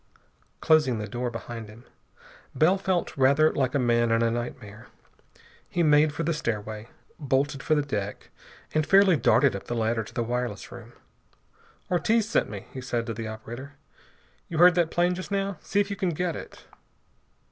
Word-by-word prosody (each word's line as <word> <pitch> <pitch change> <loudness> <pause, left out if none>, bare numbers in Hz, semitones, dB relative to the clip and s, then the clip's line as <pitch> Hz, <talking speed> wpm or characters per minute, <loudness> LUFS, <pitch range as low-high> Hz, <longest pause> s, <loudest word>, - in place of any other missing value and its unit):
Closing 150 -7 +3
the 105 -1 -4
door 125 +1 -3
behind 115 -1 -7
him, 115 +3 -15 0.7
Bell 180 +5 +3
felt 185 -2 -1
rather 140 +4 +4
like 130 -2 0
a - - +4
man 120 -2 +2
in 115 0 +2
a 115 - +2
nightmare. 115 -2 -6 0.8
He 175 - 0
made 150 0 +4
for 155 +3 -4
the 165 +2 0
stairway, 110 -5 -4 0.3
bolted 135 -1 0
for 155 - +1
the 150 - +1
deck, 105 -7 -5 0.4
and 155 - +2
fairly 195 +2 +5
darted 140 -3 +3
up 100 - -7
the 120 - -4
ladder 115 0 0
to - - -13
the 120 - 0
wireless 120 -3 -3
room. 120 0 -11 1.0
"Ortiz 215 +5 +2
sent 230 - +1
me," 100 -2 -7
he 130 - -6
said 120 -2 -2
to 115 - -4
the 110 0 -5
operator. 120 +5 -8 0.7
"You 165 - -5
heard 175 +2 +7
that 175 -2 +1
plane 175 +1 +1
just 185 +1 -6
now. 200 -1 -2
See 200 - -1
if 200 0 0
you - - -2
can 185 -1 -1
get 175 +1 -2
it." - - -10
130 Hz, 180 wpm, -26 LUFS, 115-165 Hz, 1.0 s, heard